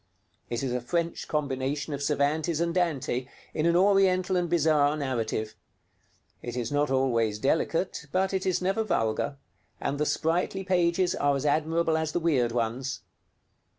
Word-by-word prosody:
It 120 +2 -2
is 130 -2 -1
a 125 - -1
French 170 +6 -2
combination 145 0 -2
of 140 - -4
Cervantes 150 +3 0
and 170 0 0
Dante, 145 -8 0 0.3
in 155 +1 +1
an 170 - +3
Oriental 190 -1 +3
and 175 -1 0
bizarre 155 -3 +3
narrative. 115 -6 -2 0.9
It 120 0 -5
is 120 0 -2
not 145 0 +1
always 120 -5 +1
delicate, 160 - 0
but 190 +1 +1
it 190 0 -1
is 185 0 0
never 195 +4 +1
vulgar, 115 - -1 0.4
and 140 +1 -2
the 150 - +1
sprightly 175 +4 0
pages 180 -1 +2
are 145 0 +1
as 140 +1 -3
admirable 160 +2 +1
as 160 -1 -2
the - - +1
weird 140 -8 +2
ones. 120 +3 -2
150 Hz, 155 wpm, -27 LUFS, 130-175 Hz, 0.9 s, an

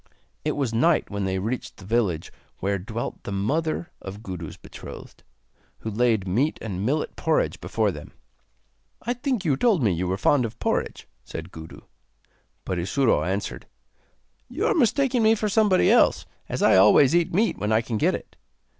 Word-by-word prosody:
It 150 - 0
was 135 -6 -2
night 150 +6 +2
when 100 -1 -2
they 95 0 -1
reached 110 +7 -4
the 95 - -12
village 100 -7 0 0.3
where 100 +1 -1
dwelt 115 +5 -5
the - - -7
mother 155 - -1
of 100 +3 -8
Gudu's 90 -6 -7
betrothed, - - -11 0.6
who 110 - -4
laid 110 -3 +1
meat 125 +12 +1
and 100 -4 -4
millet 145 +7 -1
porridge - - 0
before - - 0
them. - - -10 0.9
'I 245 - 0
think 250 -5 -2
you 145 -4 +3
told 195 - +2
me 100 -5 +3
you 90 +2 -2
were 95 +1 -1
fond 130 +5 +3
of 115 -1 -5
porridge,' - - -2 0.2
said 80 +3 -8
Gudu; 80 0 -10 0.8
but 90 - -2
Isuro 105 - +2
answered: 95 +4 -3 0.8
'You - - -2
are - - +3
mistaking 265 -3 +2
me 220 0 +5
for 215 -1 -1
somebody 205 -2 +4
else, - - +4 0.2
as - - -2
I - - +6
always 105 +8 +6
eat 175 -1 +2
meat 215 +6 +1
when 105 +1 -1
I 110 +1 +4
can 115 -2 -3
get - - +2
it. - - -10
115 Hz, 175 wpm, -25 LUFS, -, 0.9 s, I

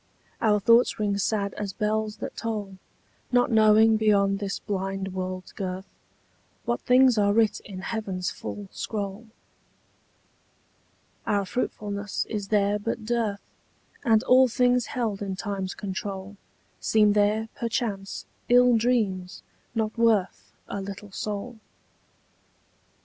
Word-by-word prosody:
Our 210 -2 +3
thoughts 230 +4 +4
ring 200 -1 0
sad 200 -1 0
as 200 -2 -3
bells 215 0 -1
that - - -6
toll, 205 -4 -4 0.5
Not 245 0 +3
knowing 220 0 +6
beyond 200 -2 +3
this 200 -1 -3
blind 195 -1 -3
world's 185 0 -5
girth 190 -1 -5 0.8
What 235 0 -1
things 250 -2 +5
are 205 0 +3
writ 220 -1 +3
in 190 -3 -9
heaven's 195 -4 -3
full 205 -1 -7
scroll. 205 +1 -5 2.0
Our 200 -1 +1
fruitfulness 205 -2 -3
is 205 -3 -3
there 205 0 +2
but 225 +1 -4
dearth, 225 -3 -1 0.6
And 225 -1 +4
all 260 +1 +6
things 245 0 +2
held 225 -6 -2
in 195 -2 -3
time's 195 -2 -4
control 195 0 -5 0.4
Seem 210 -2 +4
there, 210 +2 +2
perchance, 225 -5 -3 0.2
ill 245 0 +6
dreams, 210 -6 0 0.3
not 220 -1 -1
worth 220 -5 +1 0.2
A 200 - -4
little 200 +1 -8
soul. 210 +4 -5
210 Hz, 120 wpm, -26 LUFS, 195-225 Hz, 2.0 s, knowing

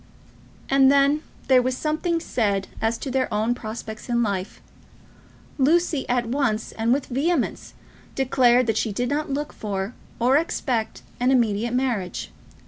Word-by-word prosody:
And 270 0 +5
then 280 +2 +4 0.3
there 260 -2 +6
was 255 0 -1
something 320 +2 0
said 200 - -1
as 225 +1 +1
to 270 - -5
their 260 0 0
own 215 +3 +1
prospects 220 -1 -7
in 235 0 +2
life. 195 -3 -3 1.0
Lucy 315 +1 +2
at 245 -1 +1
once 230 -3 -1
and 225 +1 -1
with 275 +2 +1
vehemence 285 +3 -1 0.4
declared 255 -2 +3
that 225 -1 0
she 220 - 0
did 245 +4 -2
not 295 +1 -1
look 290 +2 -3
for 200 +1 -4 0.2
or 250 +4 +4
expect 250 -8 -2 0.2
an 250 +1 +2
immediate 235 -2 +2
marriage. 240 -8 -2
250 Hz, 145 wpm, -24 LUFS, 225-275 Hz, 1.0 s, there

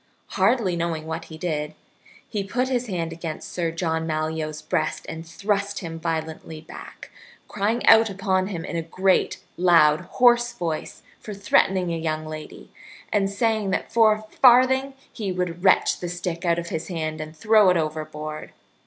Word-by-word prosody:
Hardly 195 -2 +2
knowing 165 -2 -2
what 160 +1 -5
he 160 - -10
did, 155 -2 -3 0.5
he 205 -2 -3
put 250 +6 -1
his 250 -1 -1
hand 170 -5 -3
against 165 -1 -6
Sir 170 -2 -1
John 160 -1 -2
Malyoe's 155 -1 -3
breast - - -2
and 160 0 -6
thrust 200 +3 -2
him 165 -2 -6
violently 160 -1 -4
back, 160 - -11 0.4
crying 215 +4 -1
out 225 0 +7
upon 190 -1 0
him 175 -5 -5
in - - -5
a 165 - 0
great, 185 +3 0
loud, 165 -4 +5 0.2
hoarse 240 -1 +5
voice 165 -3 -4 0.2
for 210 - -8
threatening 190 -3 +2
a - - -2
young 155 -1 -2
lady, 155 0 -9 0.4
and 200 -2 +2
saying 215 0 0
that 190 - -2
for 225 -2 +6
a 215 - -6
farthing 255 +4 +4 0.2
he 205 -5 -3
would 180 -1 -3
wrench 190 - +4
the 175 - -4
stick 180 0 -4
out 170 -1 +2
of 170 0 -4
his 160 +1 -4
hand 155 -3 -3
and 155 +1 -8
throw 215 0 +5
it 180 - +3
overboard. 155 -1 -5
175 Hz, 170 wpm, -24 LUFS, 160-205 Hz, 0.5 s, out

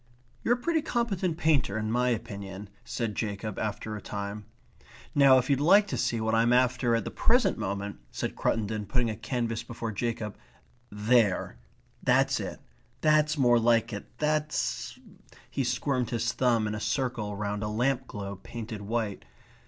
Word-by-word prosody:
"You're 240 - +3
a - - -8
pretty 320 +5 +1
competent 200 - -1
painter 145 - +2
in 110 0 -2
my 125 +1 +2
opinion," 100 -3 -4
said 115 -2 -3
Jacob 105 -1 -3
after 110 0 -3
a 105 - -6
time. 100 0 -5 0.7
"Now 140 -2 +7
if 130 0 +1
you'd 140 -2 +2
like 200 +8 +6
to - - -2
see 115 - 0
what 110 0 0
I'm 115 +1 +4
after 125 -1 +3
at 115 - 0
the - - -4
present 235 -5 +3
moment," 100 -3 -3
said - - -4
Cruttendon, 110 -1 -1
putting 120 0 +1
a - - -4
canvas 115 0 -2
before 115 -1 -5
Jacob. 110 -1 -3 0.5
"There. 105 - +2 0.4
That's - - +3
it. - - -5 0.4
That's 155 0 +3
more 120 -3 +5
like 115 0 +3
it. 100 - -6
That's 150 0 -1 0.3
..." - - -23
he 135 - 0
squirmed 125 0 0
his 115 0 -1
thumb 120 -4 +2
in 105 - -2
a 105 - -3
circle 110 -2 -1
round 105 0 -3
a 105 - -1
lamp 125 +4 0
globe 100 -2 -6
painted 115 -2 -7
white. 110 - -2
115 Hz, 170 wpm, -28 LUFS, 105-130 Hz, 0.7 s, Now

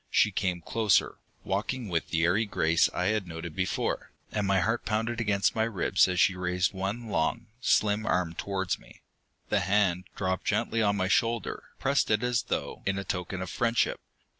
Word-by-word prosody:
She - - +3
came 90 -2 -1
closer, 105 +2 +1 0.2
walking 110 +5 -2
with 85 -4 -1
the 85 -1 +1
airy 95 +6 +3
grace 85 -4 +3
I 90 +3 0
had 105 -4 -2
noted 80 -1 -7
before, 90 0 -1 0.2
and 105 -2 -1
my 95 -1 +3
heart 115 +5 0
pounded 115 +2 -1
against 100 -3 +2
my 110 - +1
ribs 110 -4 +2
as 90 -1 -1
she 95 - +5
raised 90 +1 0
one 100 +5 -3
long, 110 +6 0 0.2
slim 105 -1 +2
arm 90 -2 +1
towards 95 0 -2
me. - - -18 0.5
The - - +3
hand 95 -2 +1
dropped 95 -1 -2
gently 115 - +1
on 100 -1 +2
my 95 - +1
shoulder, 115 +2 0
pressed 135 -3 +1
it 110 +1 +2
as 125 -1 +1
though - - -3
in 100 - +1
token 90 0 -3
of 95 - -6
friendship. 115 -1 +1
100 Hz, 180 wpm, -28 LUFS, 90-110 Hz, 0.5 s, she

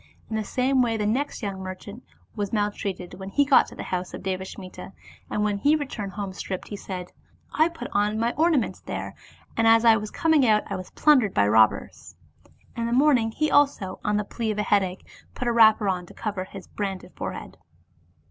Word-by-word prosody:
In - - -1
the 220 - -1
same 260 +4 +1
way 230 -2 +1
the 210 - -1
next 245 +5 -1
young 195 -2 -4
merchant 190 +5 -8 0.3
was 205 -3 -3
maltreated, 205 -4 -2
when 190 0 -6
he 285 +8 +2
got 275 -1 +5
to - - -12
the - - -6
house 180 0 -4
of - - -9
Devasmita, 190 0 -6 0.4
and 210 - -1
when 205 -1 0
he 290 +8 +4
returned 230 -10 -4
home 200 -1 -5
stripped, 185 -1 -6
he 205 - -5
said, 185 -3 -7 0.2
'' - - -33
I 325 - +2
put 300 -7 -7
on 210 -2 +1
my 230 +2 0
ornaments 315 -4 +1
there, - - -5 0.4
and 225 0 +2
as 225 +1 +5
I 225 -1 +7
was 210 0 -5
coming 320 +1 +2
out 215 -3 +4
I 200 - -4
was 185 -1 -7
plundered 260 -10 +3
by 100 - +4
robbers.'* 110 0 +2 0.6
In 230 0 -2
the 235 - -1
morning 255 -4 +4
he 305 +7 -1
also, 275 -10 +2
on 210 0 +1
the 210 - 0
plea 225 +2 -4
of 210 - -2
a 210 - +1
headache, 190 -3 0 0.3
put 250 - -3
a - - +3
wrapper 220 -2 +6
on 180 -2 -1
to - - -15
cover 200 -4 -3
his 190 0 -10
branded 195 -2 -5
forehead. - - -6
210 Hz, 210 wpm, -25 LUFS, 190-240 Hz, 0.6 s, I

